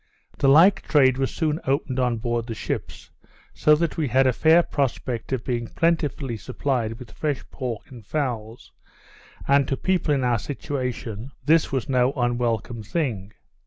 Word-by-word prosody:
The 140 - +3
like 165 +8 +6
trade 135 -4 +3
was 135 - +1
soon 155 -1 -1
opened 135 -1 0
on 125 -2 +1
board 120 0 -2
the 115 - -4
ships; - - -5 0.4
so 150 - +4
that 165 +1 -1
we 155 -3 0
had 130 +2 +3
a 130 - +3
fair 160 +6 +5
prospect 125 -5 -2
of 130 -3 -1
being 120 -2 -2
plentifully 150 -7 0
supplied 115 -1 -2
with 125 - -11
fresh 150 -4 -3
pork 125 +2 -5
and 120 -4 -11
fowls; 120 -4 -4 0.8
and 140 -1 +4
to 135 - -1
people 185 -4 0
in 140 -3 +1
our 120 -2 +2
situation, 125 -3 -4 0.2
this 160 +2 +3
was 130 -3 -1
no 130 0 +2
unwelcome 120 -2 -1
thing. 105 - -3
130 Hz, 165 wpm, -24 LUFS, 120-145 Hz, 0.8 s, like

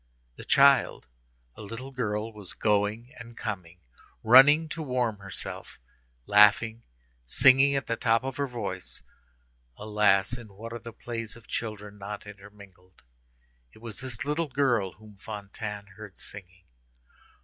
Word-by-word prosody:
The - - -11
child—a - - +1
little 115 +6 -8
girl—was 105 -5 -4
going 105 +4 0
and 115 0 -11
coming, 90 -5 -6 0.4
running 140 +7 +7
to 160 - -5
warm 125 -7 -1
herself, 100 -1 -7 0.5
laughing, 105 +2 +5 0.4
singing 135 - +5
at 135 - -1
the 115 - -2
top 115 +1 +2
of 135 0 -5
her 140 0 -1
voice. 120 - -6 0.7
Alas! 105 0 +2
in 120 -2 -10
what 115 +3 -8
are 120 - -5
the 115 +1 -9
plays 115 -1 -6
of 115 -1 -16
children 105 -2 -5
not 100 +1 -7
intermingled. 100 -4 -15 0.7
It - - -18
was 115 -1 -7
this 130 0 -5
little 150 +3 -1
girl 120 -9 +1
whom 105 +1 -17
Fantine 105 0 -7
heard 105 -4 -11
singing. 90 -2 -10
110 Hz, 130 wpm, -27 LUFS, 100-120 Hz, 0.7 s, running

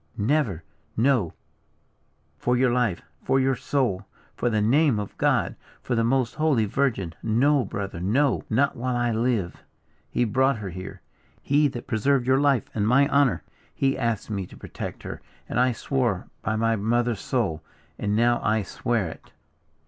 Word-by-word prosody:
"Never, 105 - 0 0.3
no! 115 - +2 1.1
for 125 +7 +1
your 125 -1 +3
life! 120 -8 0 0.2
for 135 - +2
your 135 0 +2
soul! 115 -7 -1 0.3
for 120 - 0
the 110 -2 +1
name 130 +4 +3
of 105 - -6
God! - - +2 0.3
for - - -2
the 115 -1 +2
most 125 0 +1
holy 150 -8 +2
virgin! 105 -7 -1
no, 130 +5 +3
brother, 100 -8 -5
no; 120 +9 +2
not 135 +5 +2
while 125 0 -2
I 120 -1 +1
live! 115 -5 -1 0.5
He - - +1
brought 130 +3 +2
her 100 -4 -6
here. 95 +2 -8 0.4
He 145 +1 +3
that 120 -3 -6
preserved 130 +2 +1
your 130 +1 +3
life 140 -6 +3
and 105 -1 0
my 135 +4 +5
honour. 140 -3 +2 0.3
He 135 0 +1
asked 115 -4 -2
me 100 -3 -3
to - - -14
protect - - -7
her! - - -7 0.3
and - - -1
I 125 0 +4
swore 120 -5 -1
by 110 +5 -1
my 115 +1 +2
mother's 115 +1 0
soul; 100 -12 -1 0.4
and 105 0 0
now 120 +2 +3
I 110 0 +1
swear 115 0 -1
it!" 80 - -11
120 Hz, 165 wpm, -25 LUFS, 105-135 Hz, 1.1 s, my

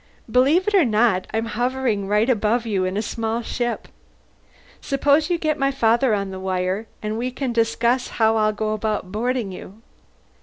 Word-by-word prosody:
"Believe 285 - +3
it 420 - +1
or 385 -4 +6
not, 215 -5 +2
I'm 225 +1 -1
hovering 235 -2 -1
right 210 +3 +2
above 230 -1 +1
you 195 -4 0
in 185 +2 -2
a 215 - -1
small 225 +1 -3
ship. 240 0 -3 0.9
Suppose 285 +3 +2
you 350 - +1
get 310 -2 -1
my 275 0 +2
father 235 -2 +2
on 200 -1 -3
the 190 - -6
wire, 185 +3 -2 0.2
and 215 +1 -2
we 250 +2 -1
can 255 -1 -3
discuss 235 +2 +1
how 220 -1 +2
I'll 215 0 +3
go 215 0 -2
about 210 -3 -2
boarding 235 0 -1
you." 200 +4 -11
225 Hz, 180 wpm, -22 LUFS, 210-255 Hz, 0.9 s, or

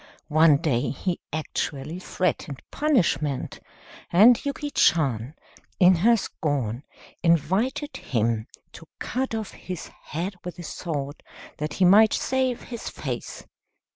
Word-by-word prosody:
One 155 -2 +6
day 140 -6 0
he 175 +5 -2
actually 155 +1 -3
threatened 165 -7 -2
punishment, 170 - 0 0.5
and 220 +7 +6
Yuki 290 0 -3
Chan, 135 - +2 0.4
in 180 -1 +6
her 230 +7 +5
scorn, 140 - -2 0.4
invited 190 - +1
him 115 -2 -1 0.2
to 165 - -13
cut 255 -1 -2
off 220 -2 -4
his 180 -3 -7
head 175 +7 -3
with 180 0 -7
a 175 - -7
sword, 145 -4 -5 0.4
that 150 0 -3
he 185 - +3
might 210 +4 +7
save 260 -2 0
his 235 -2 -6
face. - - -6
170 Hz, 120 wpm, -25 LUFS, 145-220 Hz, 0.5 s, might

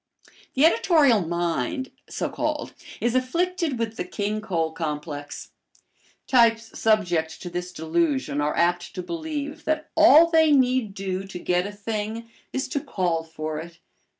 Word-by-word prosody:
The 270 +4 +5
editorial 280 - +4
mind, 170 - -2 0.2
so - - -2
called, - - -3 0.3
is 235 0 0
afflicted 330 +3 0
with 225 -1 -3
the - - -1
King 210 +1 -3
Cole 165 -6 -1
complex. 150 -2 -5 0.7
Types 230 -3 +3
subject 175 -8 +1
to 175 - -6
this 180 +1 -4
delusion 180 - 0
are 150 +1 -1
apt 175 +1 +1
to 180 - -4
believe 305 - -5
that 310 0 -1
all 320 0 +8
they 320 -2 +5
need 250 -6 +2
do 190 -1 -3
to 195 - -7
get 180 +1 0
a - - -6
thing 215 +2 -4 0.2
is 265 - -2
to 285 - -1
call 175 -9 -1
for 155 -1 -5
it. 165 +1 -10
210 Hz, 150 wpm, -24 LUFS, 170-265 Hz, 0.7 s, all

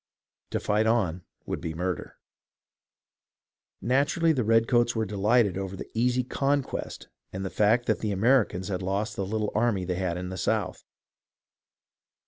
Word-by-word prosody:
To - - -1
fight 105 +1 +1
on 95 -7 +1 0.2
would - - -4
be 80 -2 -4
murder. 90 +2 -4 1.6
Naturally, 145 +6 +2
the 130 -5 0
redcoats 115 +2 +3
were 110 0 0
delighted 105 0 +2
over 95 0 -4
the - - -9
easy 125 +2 +1
conquest 140 +2 -2 0.2
and 95 +1 -5
the 95 - -4
fact 115 +3 +3
that - - +1
the 105 - -2
Americans 100 -3 +2
had 95 -2 -2
lost 100 +3 -2
the 95 - -3
little 105 0 -1
army 110 -4 +1
they 90 - -1
had 90 -2 -1
in 90 0 -5
the 95 - -6
South. - - -1
105 Hz, 150 wpm, -27 LUFS, 95-120 Hz, 1.6 s, redcoats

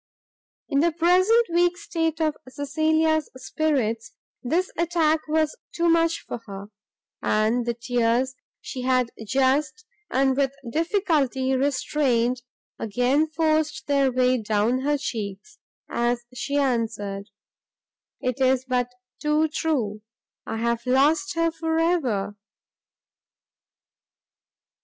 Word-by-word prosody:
In 280 - +1
the 335 +3 +3
present 365 +8 +4
weak 350 +1 +3
state 330 -5 -2
of 310 -2 +1
Cecilia's 315 +3 +1
spirits, 255 -5 -1 0.3
this 335 +9 0
attack 330 -2 +2
was 310 0 +1 0.2
too 340 0 +2
much 330 0 +2
for - - -4
her; 200 0 -8 0.5
and 220 +3 +1
the 235 - 0
tears 240 +2 +1 0.3
she 255 - -6
had 255 -1 +1 0.2
just, 280 - +1 0.2
and 265 0 +2
with 275 0 0
difficulty 295 - +1
restrained, 255 -2 +1 0.4
again 250 +8 +1
forced 310 -3 0
their 280 -2 +2
way 255 -1 +2
down 215 +4 +1
her 290 +2 +1
cheeks, 235 - -6 0.3
as 240 0 -1
she 270 +3 -3
answered, 225 -7 -1 0.9
"It 255 +1 -2
is 260 0 +2
but 250 -1 0 0.3
too 305 +1 +2
true, 245 -10 -1 0.5
I 225 - -3
have 235 +1 -1
lost 290 +3 +3
her 330 0 +2
for 320 0 -2
ever!" 255 - 0
275 Hz, 110 wpm, -24 LUFS, 240-315 Hz, 0.9 s, present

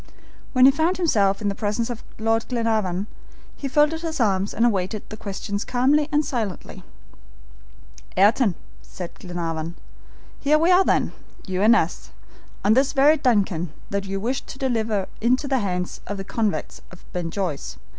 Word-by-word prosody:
When 255 -1 +6
he 270 - +9
found 320 +6 +1
himself 210 - +2
in - - 0
the 200 - +1
presence 215 +3 -2
of 235 - -7
Lord 225 +1 0
Glenarvan 220 -6 0 0.5
he 280 - -4
folded 300 +4 +2
his 320 -2 -3
arms 200 -3 +1
and 230 - +2
awaited 205 -1 -1
the 215 - -6
questions 200 -1 -4
calmly 280 +5 +2
and 300 0 +2
silently. 220 -8 -4 1.3
"Ayrton," 205 0 +4 0.3
said 180 -2 -8
Glenarvan, 170 -2 -4 0.6
"here 295 +2 +3
we 330 +4 +3
are 365 +1 +6
then, - - +1 0.3
you 185 -1 -2
and 225 +3 +6
us, 170 -6 -1 0.6
on 210 - +6
this 265 +3 +3
very 295 +3 +5
DUNCAN 195 - +1 0.2
that 200 0 -1
you 195 0 -2
wished 245 +6 -2
to - - -8
deliver 225 -7 0
into 255 +5 +2
the 270 -2 +1
hands 180 -4 -3
of 205 - -4
the 195 - -4
convicts 215 +1 -2
of 180 - -15
Ben 175 -2 -2
Joyce." 175 -6 -3
220 Hz, 165 wpm, -23 LUFS, 195-265 Hz, 1.3 s, he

